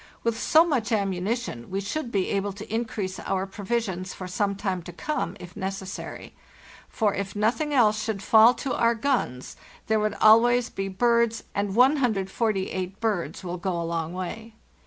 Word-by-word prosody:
With 230 -1 0
so 320 +2 +5
much 255 -10 -1
ammunition, 195 - -2
we 195 - -2
should 235 +6 -4
be 195 -4 0
able 200 0 -1
to 210 +2 -9
increase 220 -5 -3
our 190 0 -1
provisions 195 -2 -3
for 185 - -7
some 200 +2 -1
time 190 -2 -2
to 175 - -9
come, 200 - -3
if 180 0 -11
necessary; 190 0 -6 0.6
for 210 -3 +1
if 195 0 -4
nothing 235 +9 0
else 215 -6 +3
should 205 -3 -3
fall 225 +4 +7
to 260 +2 -3
our 235 0 +2
guns 225 - -1 0.3
there 220 0 +2
would 210 -1 0
always 235 +2 +5
be 195 0 -3
birds, 235 +3 +2
and 200 -1 -1
148 215 -7 +1
birds 210 -5 -2
will 180 0 -4
go 180 -1 -2
a - - -2
long 165 -1 -2
way. 215 +5 -6
205 Hz, 165 wpm, -26 LUFS, 190-230 Hz, 0.6 s, fall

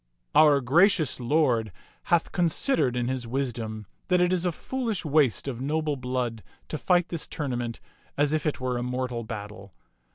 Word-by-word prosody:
" - - -48
Our 145 -3 +6
gracious 160 +3 +3
lord 120 -5 +1 0.3
hath 170 -2 +2
considered 170 - +1
in 120 -1 -1
his 130 -2 -3
wisdom 115 -4 -3 0.2
that 180 -1 +3
it 180 +1 +3
is 180 0 +1
a - - +1
foolish 230 0 -3
waste 145 -6 +2
of 125 -3 -4
noble 150 +1 0
blood 125 -3 -3 0.3
to 155 - -4
fight 180 -1 +2
this 170 -3 -4
tournament 120 -5 -3 0.4
as 145 +1 +2
if 155 -1 0
it 150 - -1
were 125 -1 -1
a - - -3
mortal 125 -1 -3
battle. 105 -4 -8
130 Hz, 170 wpm, -26 LUFS, 120-160 Hz, 0.4 s, Our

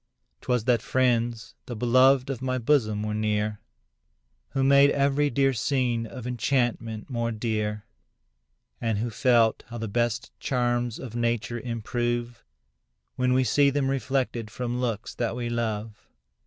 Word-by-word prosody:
'Twas 125 -3 0
that 120 -2 +2
friends, 120 -3 0
the 120 - -5
beloved 130 +3 +4
of 130 - -5
my 130 -1 -1
bosom, 115 -5 +1
were 105 0 -2
near, 105 -1 -1 0.9
Who 135 - +1
made 140 +1 +6
every 140 +1 +2
dear 135 -1 +2
scene 120 -2 0
of 120 +1 -9
enchantment 120 -3 -1
more 115 -3 -2
dear, 105 -1 -2 1.0
And 115 -3 0
who 115 +3 -2
felt 115 0 +3
how 120 - -7
the 115 -1 -4
best 120 +2 -1
charms 120 -2 0
of 120 -3 -8
nature 120 0 -1
improve, 120 0 -3 0.7
When 125 0 +1
we 130 +1 +3
see 140 +2 +4
them 140 -1 0
reflected 130 -3 -1
from 120 +2 -3
looks 115 -3 -3
that 115 -1 -2
we 120 -1 -3
love. 110 -2 -3
120 Hz, 140 wpm, -26 LUFS, 115-130 Hz, 1.0 s, made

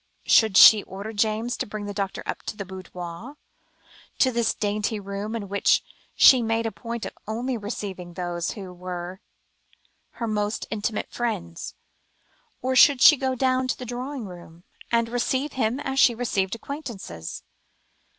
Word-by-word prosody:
Should 220 -4 +5
she 215 -2 +10
order 200 +4 -7
James 220 +3 0
to - - -3
bring 210 0 -6
the 205 - -5
doctor 195 -1 -3
up - - -4
to 210 - -4
the 200 - -5
boudoir 185 - -8 0.8
to 260 - +3
this 235 -2 0
dainty 210 +1 -1
room 200 +2 -5
in 210 -3 -4
which 200 +1 +2 0.3
she 260 -2 +8
made 225 0 0
a 225 - -1
point 230 +2 -6
of - - -7
only 240 +4 -2
receiving 195 -5 -6
those 175 -1 -3
who 190 -5 -8
were 180 +1 -6 0.9
her 235 - -4
most 210 -1 -1
intimate 215 0 -2
friends? 150 - -4 0.9
Or 260 0 0
should 275 +1 +7
she 300 - +9
go 265 -1 -1
down 255 0 +1
to - - -1
the 250 - -7
drawing 250 +1 -5
room, 175 -2 -12 0.3
and 230 -1 +2
receive 260 +4 -1
him 245 +1 0
as 270 -2 -2
she 240 - +6
received 205 -4 -1
acquaintances? 225 - -7
220 Hz, 160 wpm, -25 LUFS, 195-245 Hz, 0.9 s, she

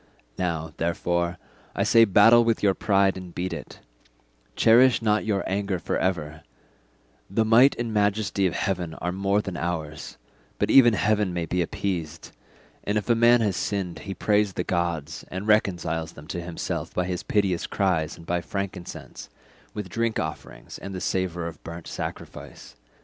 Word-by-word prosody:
Now, 80 -3 -2
therefore, 85 +1 -1 0.4
I - - +1
say 115 0 +6
battle 115 +4 +6
with 115 -2 0
your 100 -2 +4
pride 100 -1 +2
and 90 -2 -10
beat 90 +1 -3
it; - - -9 0.7
cherish 120 +3 +5
not 110 -1 +1
your 100 -3 0
anger 100 -1 -1
for 85 - -3
ever; 80 -4 -2 0.9
the 110 +4 +1
might 120 +5 +6
and 115 -2 -3
majesty 105 -2 +1
of 85 - -4
heaven 90 -4 -2
are 90 +2 -3
more 100 +2 +1
than 95 - -5
ours, 80 -3 -4 0.4
but - - 0
even 120 -4 +7
heaven 105 -3 +1
may 85 -1 -1
be 90 +2 -1
appeased; 85 -2 -4 0.5
and 105 +1 0
if 105 +3 0
a - - +7
man 120 +1 +5
has 105 -4 +1
sinned 95 -4 -3
he 100 -1 -6
prays 105 +1 +1
the 90 - -2
gods, 85 -3 -2
and 95 +3 -5
reconciles 85 -6 +1
them 75 - -12
to 90 - -3
himself 85 0 -4
by 90 - 0
his 90 -1 -3
piteous 95 -4 0
cries 85 -5 0
and 85 - -13
by 85 +1 -1
frankincense, 95 -1 -6 0.5
with 105 -2 -4
drink 115 +4 -1
offerings 80 0 -7
and 95 -1 -7
the - - -4
savour 90 -2 -2
of 85 -2 -8
burnt 85 0 -8
sacrifice. - - -8
95 Hz, 165 wpm, -25 LUFS, 85-105 Hz, 0.9 s, even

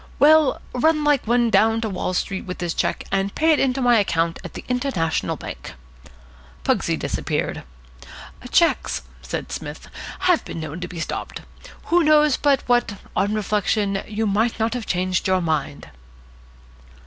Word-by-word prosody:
"Well, 310 -1 +5
run 305 +4 +2
like 290 -5 +2
one 235 0 +3
down 225 +1 +4
to 220 - -2
Wall 185 0 -2
Street 190 +1 -2
with 180 - -5
this 175 -2 -2
cheque, - - -1
and 195 0 0
pay 320 +1 +3
it 310 - +3
in 265 - +3
to 270 - -3
my 240 -2 +5
account 165 -4 0
at - - -9
the - - -8
International 250 - -1
Bank." - - -8 0.9
Pugsy - - +1
disappeared. - - -2 0.9
"Cheques," 335 +5 +2 0.2
said - - -5
Psmith, - - -7 0.3
"have 360 -3 +3
been - - -7
known 155 +1 -6
to 180 - -5
be 175 -1 -8
stopped. 160 - -5 0.4
Who 345 +1 +3
knows 300 -2 +5
but 280 -2 +2
what, 240 -4 +2 0.2
on 205 +2 +1
reflection, 205 -1 0
you 215 +1 -2
might 220 +3 +1
not 225 +1 +1
have 245 -3 -5
changed 185 +1 0
your 185 0 +3
mind?" 150 - -2
220 Hz, 160 wpm, -22 LUFS, 185-270 Hz, 0.9 s, Well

